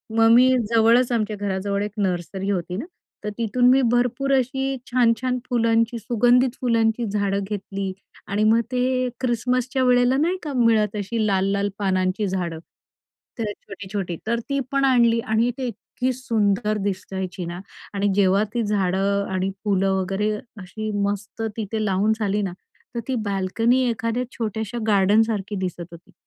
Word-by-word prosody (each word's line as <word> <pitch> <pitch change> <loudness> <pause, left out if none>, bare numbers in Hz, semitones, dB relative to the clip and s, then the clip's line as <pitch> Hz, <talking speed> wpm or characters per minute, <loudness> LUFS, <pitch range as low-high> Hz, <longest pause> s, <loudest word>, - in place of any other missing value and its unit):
मग 225 0 +5
मी 250 +2 +7 0.2
जवळच 230 +2 +4
आमच्या 215 -2 0
घराजवळ 200 0 -2
एक 210 - -4
नर्सरी 190 0 -2
होती 180 -2 -2
ना, 240 - -4 0.4
तर 210 - -2
तिथून 240 +2 +2
मी 265 +1 +5
भरपूर 245 +3 +1
अशी 265 +1 0 0.2
छान-छान 250 +1 +2
फुलांची, 230 -1 +2
सुगंधित 245 +3 +2
फुलांची 230 -1 +1
झाडं 200 -1 -1
घेतली 195 -1 -4 0.4
आणि 205 +2 0
मग 220 +2 +5
ते 250 -1 0 0.2
अ, - - -1
ख्रिसमसच्या 255 +1 0
वेळेला 250 +1 +4
नाही 340 +6 +1
का 295 -3 -4
मिळत 225 -4 +3
अशी 215 +2 -1
लाल-लाल 200 +1 +1
पानांची 190 +1 0
झाडं? 175 -4 -3 0.8
तर 215 -2 -1
छोटी-छोटी, 195 -3 -6
तर 235 +1 +1
ती 280 0 0
पण 275 0 +2
आणली 235 -3 +4
आणि 225 +1 +1
ती 260 -2 -2
इतकी 245 +3 -3
सुंदर 215 -4 0
दिसायची 190 -2 -4
ना. 170 +1 -6 0.3
आणि 200 0 0
जेव्हा 195 0 +4
ती 240 -1 0
झाडं 200 -1 +1
आणि 190 0 0
फुलं 195 -2 +2
वगैरे 195 +3 -1 0.3
अशी 215 +4 -5 0.2
मस्त 205 +2 -5 0.2
तिथे 215 0 -2
लावून 200 +2 +2
झाली 210 -1 0
ना, 190 -3 -3 0.4
तर - - -1
ती 265 - -1
बाल्कनी 225 +6 +1
एखाद्या 230 +2 -1
छोट्याशा 220 0 -3
गार्डनसारखी 210 0 +2
दिसत 180 -2 -4
होती. 170 0 -14
215 Hz, 150 wpm, -23 LUFS, 195-240 Hz, 0.8 s, मी